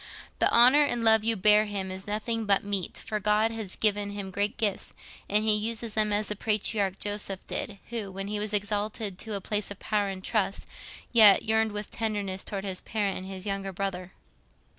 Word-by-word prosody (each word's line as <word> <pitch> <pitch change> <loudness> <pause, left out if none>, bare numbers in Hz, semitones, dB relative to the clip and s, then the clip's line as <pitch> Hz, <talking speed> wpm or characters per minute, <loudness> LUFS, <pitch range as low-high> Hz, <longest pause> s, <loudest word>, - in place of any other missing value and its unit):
The - - +3
honour 255 +5 +6
and 240 -5 -1
love 220 -1 +6
you 225 0 +2
bear 210 +2 +5
him 195 -2 -4
is 190 +2 -8
nothing 220 +1 -2
but 200 -1 +3
meet, 200 -3 -2
for 215 - -4
God 210 +2 +2
has 220 -4 -5
given 205 -1 +2
him 200 -1 -6
great 205 +2 -2
gifts, 210 -4 -2 0.3
and 210 +1 +3
he 220 -1 +3
uses 225 +1 -1
them 215 -1 +1
as 205 0 0
the 210 - -2
patriarch 205 -2 0
Joseph 205 -2 -2
did, 205 - -4
who, 220 -5 -4
when 195 +1 -6
he 210 0 -2
was 210 0 -3
exalted 205 -1 -1
to 220 -2 -3
a 200 - -4
place 210 +1 -2
of 205 - -7
power 205 -1 -1
and 190 -1 -6
trust, 200 -2 -1 0.5
yet 215 -4 +7
yearned 220 0 +1
with 210 0 -5
tenderness 205 -4 -3
towards 200 -1 -5
his 190 -2 -2
parent 205 -3 -2
and 185 - -9
his 190 0 -6
younger 195 -1 -3
brother. 185 -1 -5
205 Hz, 205 wpm, -27 LUFS, 195-215 Hz, 0.5 s, yet